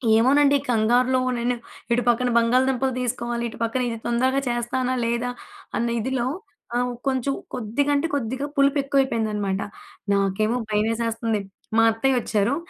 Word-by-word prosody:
ఏమోనండి. 280 +5 +5
కంగారులో, 245 +3 +3 0.2
నేను 240 +1 0 0.4
ఇటు 240 +1 +2
పక్కన 245 +1 +2
బంగాళదుంపలు 255 +2 +2
తీసుకోవాలి, 240 -1 -2
ఇటు - - -11
పక్కన 230 +3 0
ఇది 230 - -4
తొందరగా 260 +3 +2
చేస్తానా 245 +2 -1
లేదా, 235 +1 -1 0.5
అన్న 235 - 0
ఇదిలో 255 +1 -1 0.5
ఆహ్, 245 +1 +1
ఉ - - -6
కొంచెం 265 0 0 0.2
కొద్దిగంటే 280 +7 0
కొద్దిగా 260 +1 -2
పులుపెక్కువైపోయిందనమాట. 265 -8 +1 0.5
నాకేమో 200 +3 +1
భయవేసేస్తంది. 225 +1 0 0.4
మా 225 - +6
అత్తయ్య 260 +4 +1
వచ్చారు. 215 +2 +1
240 Hz, 125 wpm, -23 LUFS, 225-260 Hz, 0.5 s, మా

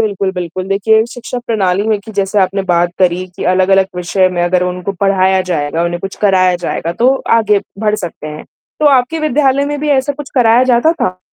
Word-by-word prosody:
बिल्कुल, 200 -3 -1
बिल्कुल। 180 +1 -5
देखिए 220 +3 +2
शिक्षा 245 +1 -6
प्रणाली 200 -4 0
में 215 -2 +1
कि 220 +1 -11
जैसे 200 +1 -1
आपने 195 +1 0
बात 175 0 +2
करी 185 0 +1
कि - - -5
अलग-अलग 190 +1 +3
विषय 185 +1 +1
में 175 -1 -2
अगर 180 +1 +1
उनको 180 +2 -3
पढ़ाया 190 0 +2
जाएगा, 155 +1 -1
उन्हें 175 0 -2
कुछ 195 +1 -6
कराया 185 -3 +3
जाएगा 170 -1 -3
तो 250 +8 +2 0.2
आगे 210 -3 +2 0.2
बढ़ 210 -1 0
सकते 175 -6 -6
हैं। 150 0 -8 0.4
तो 305 - +3
आपके 265 +5 +1
विद्यालय 280 -2 +1
में 290 0 -3
भी 300 - -2
ऐसा 280 0 +1
कुछ 285 -1 -9
कराया 240 -1 +4
जाता 255 +6 +3
था? 185 - -3
195 Hz, 200 wpm, -14 LUFS, 180-235 Hz, 0.4 s, कराया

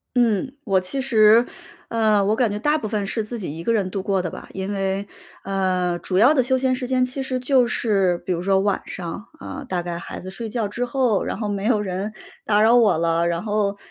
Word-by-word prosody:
嗯， 240 +2 +2
我 190 -3 +2
其 225 +9 -4
实 225 -2 +5 0.4
呃， 220 -3 +2
我 215 +2 +2
感 230 -3 +1
觉 210 - -3
大 295 +5 +2
部 230 - -6
分 210 -2 -2
是 220 +2 -1
自 230 +2 -6
己 160 -5 -5
一 165 - -6
个 230 - +1
人 200 -4 +1
度 190 0 -4
过 195 -2 +1
的 175 - -3
吧。 - - -10
因 190 +1 -4
为， 195 0 -2 0.4
呃， 185 -2 0
主 185 - -2
要 250 +9 +6
的 260 -4 +3
休 260 +1 +1
闲 255 0 +1
时 250 -1 -4
间 255 0 +2
其 265 +2 -4
实 255 -1 -2
就 255 -1 +3
是 195 -7 +1
比 185 - 0
如 170 - -3
说 195 +1 +2
晚 200 0 0
上， 185 +4 -6
啊， - - -7
大 180 -2 -1
概 170 -1 -4
孩 - - -7
子 185 - -8
睡 220 +4 -6
觉 225 -2 -1
之 235 +4 -3
后， 245 -5 +1
然 - - -4
后 210 - -2
没 200 -1 -3
有 220 -1 +2
人 195 +1 -3 0.3
打 210 0 +3
扰 230 +2 +5
我 210 -9 +4
了。 165 0 +1
然 170 0 -1
后 205 -2 -1
210 Hz, 260 characters per minute, -22 LUFS, 190-240 Hz, 0.4 s, 要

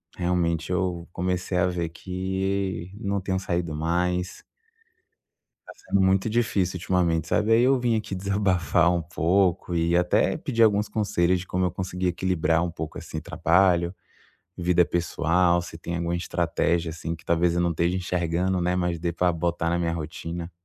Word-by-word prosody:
realmente 85 -2 0
eu 90 -2 -1
comecei 90 +1 -2
a 90 - +3
ver 85 -2 -2
que 95 +1 -3
não 100 -2 -1
tenho 95 0 -1
saído 85 -3 -2
mais 90 +3 -1 1.2
Tá - - -10
sendo 100 - -1
muito 95 +3 +3
difícil 105 -6 0
ultimamente, 85 -3 0
sabe, 110 +1 +1
aí 115 +1 +6
eu 135 +1 +4
vim 120 -2 +1
aqui 105 -3 -4
desabafar 90 -3 +2
um 85 -1 +1
pouco 85 +2 +1
e 85 +1 +2
até 90 0 +2
pedir 115 -1 +1
alguns 105 -1 +3
conselhos 95 -4 +1
de - - -9
como 90 0 0
eu 90 - 0
conseguir 90 0 -3
equilibrar 90 -2 +1
um 90 - -2
pouco 80 -2 -6
assim 80 - -6
trabalho, 85 0 +2 0.6
vida 90 0 +3
pessoal, 85 +1 +1
se 85 -1 -8
tem 85 +1 -5
alguma 85 0 -1
estratégia, 85 -1 0
assim, 80 +1 -5
que 80 - -20
talvez 85 0 +2
eu - - +2
não 85 0 +1
esteja 85 +3 0
enxergando, 90 0 -1
né, 90 +1 0
mas 90 -2 -1
dê 85 0 -1
pra 90 +1 +1
botar 85 0 -1
na 85 +1 +1
minha 85 -1 0
rotina? 85 +1 -5
90 Hz, 170 wpm, -25 LUFS, 85-95 Hz, 1.2 s, aí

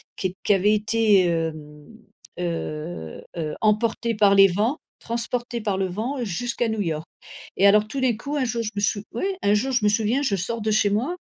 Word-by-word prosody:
qu 185 - -2
qui 205 - +4
avaient 200 +2 +3
été, 215 -2 +3
hem, 155 -3 -3 0.5
heu 155 - -5
heu, 155 -2 -3
emportés 225 +1 +1
par 200 -1 +4
les 195 0 +8
vents, 210 - 0 0.2
transportés 235 +1 -3
par 205 -3 -1
le 190 -1 0
vent 240 +8 -3
jusqu'à 235 +4 -2
New 220 -1 -1
York 160 -3 -2 0.5
et 195 - +4
alors 210 +1 +5
tout 275 - -4
d'un 255 -4 +2
coup, 280 +6 -5
un 265 - +1
jour 235 -1 -2
je 215 - -2
me - - -2
sou 205 0 +1
oui, 235 - -3 0.2
un 205 - +3
jour 265 +6 0
je 245 -4 +1
me 210 - +4
souviens, 220 +5 +1
je 260 -8 +1
sors 225 +5 -3
de 215 - -1
chez 210 -1 +3
moi 255 - 0
210 Hz, 205 wpm, -23 LUFS, 185-235 Hz, 0.5 s, les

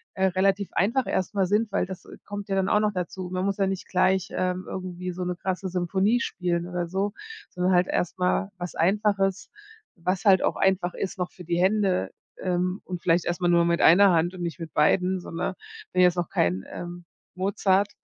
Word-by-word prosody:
äh, 190 0 +1
relativ 195 +2 +1
einfach 235 +8 +1
erst 190 +2 -1
mal 195 -1 +3
sind, 210 +2 +1
weil - - +1
das, 190 -1 -9
äh, - - -12
kommt 205 0 -6
ja 195 - 0
dann 190 0 +1
auch 210 - +4
noch 210 -1 +1
dazu. 180 0 -4
Man 185 +1 -1
muss 200 0 -1
ja 195 - +2
nicht 190 -1 -4
gleich, 190 0 +2
ähm, 185 0 -2
irgendwie 180 -1 -5
so 180 +1 -5
'ne 180 - -2
krasse 190 +2 -3
Symphonie 190 +6 +1
spielen 175 -1 -2
oder 175 -1 -3
so, 195 +3 -1 0.4
sondern 180 +1 0
halt 180 +1 +4
erst 180 +1 -1
mal 185 +2 0
was 175 -1 -5
Einfaches, 195 +1 +1 0.5
was 180 0 -2
halt 190 -2 +6
auch - - +1
einfach 190 -2 +1
ist 195 - -4
noch 180 - -2
für 180 - -12
die 170 +1 -1
Hände, 190 -1 +2 0.3
ähm, 180 +1 -1
und 180 -2 -5
vielleicht 170 0 +2
erstmal 175 0 0
nur 170 0 +4
mit 170 0 +1
einer 195 +4 +7
Hand 170 +2 +2
und 185 - -8
nicht 170 0 -4
mit 160 -3 -7
beiden, 180 +5 +2
so, - - -10
ne? 170 +2 -3 0.4
Bin 185 - +3
jetzt 180 -1 +5
noch 175 -2 -2
kein, 90 +2 0
ähm, 175 0 -7 0.3
Mozart. 195 +1 +2
185 Hz, 215 wpm, -26 LUFS, 175-195 Hz, 0.5 s, einer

